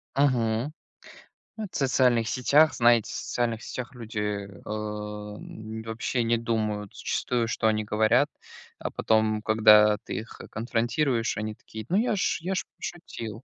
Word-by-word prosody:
Мгм, 125 Hz, -1 st, +1 dB, 0.8 s
ну 220 Hz, -, -4 dB
это 200 Hz, -, -7 dB
в -, -, -9 dB
социальных 125 Hz, -4 st, +3 dB
сетях, 145 Hz, +6 st, +4 dB
знаете, 120 Hz, -2 st, +4 dB
в -, -, -6 dB
социальных 115 Hz, -2 st, -2 dB
сетях 125 Hz, 0 st, -6 dB
люди, 115 Hz, -3 st, -6 dB, 0.3 s
эм, 105 Hz, +1 st, -6 dB
вообще 115 Hz, +2 st, -2 dB
не 115 Hz, +1 st, +2 dB
думают 110 Hz, -3 st, -2 dB
зачастую, 120 Hz, -2 st, -1 dB
что 115 Hz, 0 st, 0 dB
они 110 Hz, -1 st, +2 dB
говорят, 110 Hz, +7 st, +3 dB, 0.5 s
а -, -, -3 dB
потом, 110 Hz, -1 st, +1 dB
когда 105 Hz, -1 st, +6 dB
ты -, -, -5 dB
их 110 Hz, -, -7 dB
конфронтируешь, 120 Hz, +2 st, 0 dB
они 110 Hz, 0 st, -3 dB
такие: 110 Hz, 0 st, -9 dB
"Ну, 185 Hz, -, +2 dB
я 220 Hz, 0 st, +2 dB
ж 190 Hz, -, 0 dB
я 185 Hz, +3 st, -2 dB
ж -, -, 0 dB
пошутил". 115 Hz, -, -7 dB
115 Hz, 145 wpm, -27 LUFS, 110-125 Hz, 0.8 s, когда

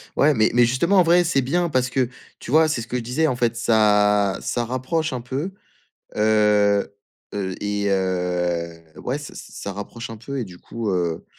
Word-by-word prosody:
Ouais 150 Hz, +2 st, +4 dB
mais 110 Hz, -4 st, +3 dB
mais 120 Hz, 0 st, +5 dB
justement 170 Hz, +11 st, +2 dB
en -, -, +6 dB
vrai 175 Hz, +1 st, +4 dB
c'est 160 Hz, -5 st, +1 dB
bien 170 Hz, +7 st, 0 dB
parce 130 Hz, -3 st, +1 dB
que, 130 Hz, -1 st, 0 dB, 0.3 s
tu -, -, -8 dB
vois? 160 Hz, +2 st, +5 dB
C'est 155 Hz, -6 st, -1 dB
ce 115 Hz, -, -8 dB
que 125 Hz, -, -2 dB
je -, -, -3 dB
disais 125 Hz, +8 st, 0 dB
en 130 Hz, -, 0 dB
fait 120 Hz, -1 st, 0 dB
ça 105 Hz, -3 st, +3 dB
ça 120 Hz, -, -1 dB
rapproche 130 Hz, +7 st, -2 dB
un 125 Hz, -, -3 dB
peu, 135 Hz, +9 st, -4 dB, 0.7 s
heu, 105 Hz, -2 st, +3 dB, 0.4 s
heu, 95 Hz, -2 st, -3 dB
et 100 Hz, 0 st, -1 dB
heu, 90 Hz, -3 st, -1 dB, 0.2 s
ouais 125 Hz, -, -2 dB
s 145 Hz, 0 st, -8 dB
s -, -, -10 dB
ça 100 Hz, -, -6 dB
rapproche 110 Hz, +4 st, -7 dB
un 115 Hz, -, -7 dB
peu 140 Hz, +5 st, -6 dB
et 125 Hz, -, -2 dB
du 90 Hz, -3 st, -12 dB
coup, 115 Hz, +2 st, -4 dB
heu, 85 Hz, -3 st, -1 dB
115 Hz, 205 wpm, -22 LUFS, 100-135 Hz, 0.7 s, en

